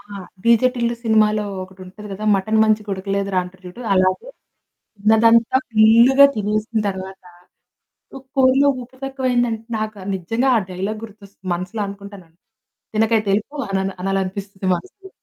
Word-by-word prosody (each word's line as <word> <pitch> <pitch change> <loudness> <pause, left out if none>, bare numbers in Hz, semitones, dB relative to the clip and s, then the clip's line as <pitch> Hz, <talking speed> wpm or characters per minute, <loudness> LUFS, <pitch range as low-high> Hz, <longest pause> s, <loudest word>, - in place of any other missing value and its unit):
ఆ! - - -20 0.4
డిజే 235 +2 +5
టిల్లు 235 -1 -1
సినిమాలో 215 -1 +2 0.2
ఒకటి 185 0 -13
ఉంటది 210 +3 -11
కదా 200 +2 -6
"మటన్ 215 +3 +1
మంచిగా 215 -1 0
ఉడకలేదురా" 195 0 -2
అంటారు 185 +1 -14
చూడు. 180 +7 -10
అలాగే 185 - +1 0.7
తిన్నదంతా 225 +3 +4
ఫుల్లుగా 230 +5 +6
తినేసిన 215 +2 -1
తరువాత, 190 0 -7 0.9
ఉ - - -9 0.2
కూరలో 270 +1 +4
ఉప్పు 260 +2 -18
తక్కువ 270 -1 -3
అయిందంటే, 240 -2 0 0.2
నాకు 215 -1 -4 0.2
నిజంగా 225 +9 -1
ఆ - - +3
డైలాగ్ 200 +4 -4
గుర్తొస్తుంది. 200 -3 -15
మనసులో 185 +5 -5
అనుకుంటాను, 200 -2 -10 0.7
"తినకయతె 220 -1 +1
ఎళ్లిపో" 280 +8 -6
అనన 190 0 0
అనాలి 195 0 0
అనిపిస్తుంది 195 0 -6
మనసులో. 385 - -13
215 Hz, 140 wpm, -20 LUFS, 195-230 Hz, 0.9 s, ఫుల్లుగా